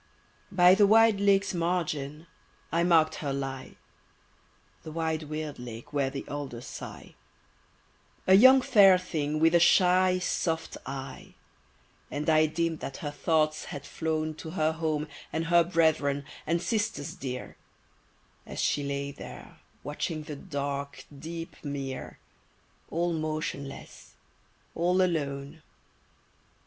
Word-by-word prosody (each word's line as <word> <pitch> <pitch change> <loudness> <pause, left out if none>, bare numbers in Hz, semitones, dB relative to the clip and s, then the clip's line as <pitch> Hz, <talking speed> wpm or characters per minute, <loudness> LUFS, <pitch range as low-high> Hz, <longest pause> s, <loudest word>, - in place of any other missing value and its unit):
BY 180 -1 +6
the 205 +1 +5
wide 225 -1 +5
lake's 200 0 +3
margin 165 -4 -2 0.5
I 170 - +2
mark'd 165 -3 +4
her 145 -3 -2
lie— 135 -1 -5 1.1
The 155 - -9
wide, 160 0 -1
weird 155 -2 -5
lake 125 +4 -9
where 140 -2 +1
the 135 0 -7
alders 135 -4 -6
sigh— - - -9 1.1
A 190 - +5
young 260 +6 +8
fair 200 -8 +7
thing, 155 -4 -2
with 165 +1 +4
a 170 - +6
shy, 185 +1 +5
soft 165 -2 -2
eye; 135 0 -7 0.7
And 150 +2 -1
I 155 0 +5
deem'd 165 +1 -1
that 135 - -6
her 145 - -2
thoughts 155 0 +1
had 145 -1 -7
flown 155 -1 -2
To 160 - -7
her 160 -2 +1
home, 155 -2 -2 0.2
and 160 +1 -2
her 170 +1 +5
brethren, 160 -5 +1 0.2
and 170 +2 0
sisters 205 -11 -2
dear, 125 -1 -6 0.9
As - - -7
she 145 - +1
lay 140 0 -3
there 140 - -11 0.2
watching 155 +1 -3
the 150 -1 -7
dark, 140 -3 -5
deep 165 +3 -7
mere, 140 -3 -5 0.7
All 170 +1 0
motionless, 155 -3 -5 0.6
all 180 +2 +1
alone. 145 -3 -2
155 Hz, 125 wpm, -28 LUFS, 145-175 Hz, 1.1 s, young